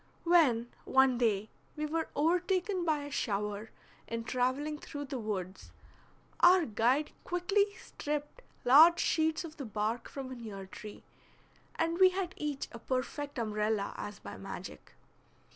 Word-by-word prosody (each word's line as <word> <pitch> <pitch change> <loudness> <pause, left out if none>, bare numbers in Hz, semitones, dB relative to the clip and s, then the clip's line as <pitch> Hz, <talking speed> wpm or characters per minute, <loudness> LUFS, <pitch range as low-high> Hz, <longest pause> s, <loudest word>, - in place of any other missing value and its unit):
When, 270 -10 +4
one 265 -2 +4
day, 215 -3 +1 0.2
we 305 0 -2
were 320 +1 -2
overtaken 360 +4 +1
by 305 -3 +1
a 290 - -7
shower 210 -2 -2 0.4
in 230 0 -3
traveling 260 +5 -1
through 290 -1 -6
the 270 -1 -4
woods, 195 -4 -5 0.7
our 355 0 +7
guide 245 +6 +1
quickly 400 +3 +1
stripped 295 +8 -5 0.2
large 315 +7 +8
sheets 320 0 +1
of 320 -2 -9
the 275 - -5
bark 215 +3 -2
from 265 -2 -6
a - - -5
near 210 -5 -7
tree, 210 +2 -10 0.7
and 330 +1 0
we 375 -1 +8
had 370 -1 -3
each 295 -2 -3
a 235 - -9
perfect 265 +4 -3
umbrella 215 -2 -1
as 205 0 -6
by - - -9
magic. - - -8
275 Hz, 145 wpm, -32 LUFS, 225-330 Hz, 0.7 s, large